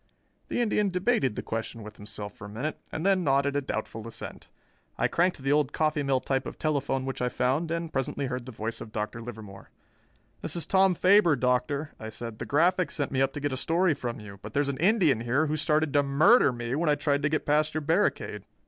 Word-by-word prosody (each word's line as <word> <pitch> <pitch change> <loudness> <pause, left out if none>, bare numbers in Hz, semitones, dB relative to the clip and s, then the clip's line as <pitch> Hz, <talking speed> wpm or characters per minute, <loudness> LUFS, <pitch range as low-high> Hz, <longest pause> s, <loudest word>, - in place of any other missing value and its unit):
The - - -1
Indian 210 -3 +1
debated 180 - +1
the - - -4
question 115 0 -4
with 105 0 -11
himself 105 0 -8
for 105 - -11
a - - -8
minute 125 +9 -4
and 160 - -4
then 195 -2 +3
nodded 140 -1 +2
a 145 - +2
doubtful 115 -3 -5
assent. 115 - -9 0.5
I - - +2
cranked 180 +2 +1
the 135 - +1
old 145 -1 +2
coffee 155 -1 +1
mill 135 -2 +1
type 135 +1 -1
of - - -7
telephone 140 -3 -1
which 135 -1 -4
I 125 - +1
found, 135 +7 0
and 165 -1 -3
presently 135 +1 -1
heard 125 -1 -4
the - - -6
voice 110 0 -5
of 110 - -8
Dr. 105 +2 -4
Livermore. 110 -4 -10 0.7
"This - - -2
is 170 - 0
Tom 190 -1 +4
Faber, 185 -3 +5
Doctor," 130 +4 0
I 110 - -6
said. 110 0 -8
"The - - -5
Graphic 175 +2 +2
sent 140 - -3
me 135 - +1
up 135 0 +2
to - - -4
get 145 -1 -2
a - - -2
story 170 +4 +2
from 120 -5 -5
you, 100 -2 -11
but 110 +1 -9
there's 145 0 +2
an 135 - -3
Indian 175 - +3
here 130 +6 +1
who 155 0 -1
started 155 -1 +1
to 145 - +5
murder 145 - +5
me 120 0 -4
when 155 +3 +1
I 150 - +4
tried 145 -1 0
to 150 - +1
get 155 - -1
past 150 +1 +2
your 155 - 0
barricade." 165 +7 0
140 Hz, 230 wpm, -28 LUFS, 120-160 Hz, 0.7 s, Faber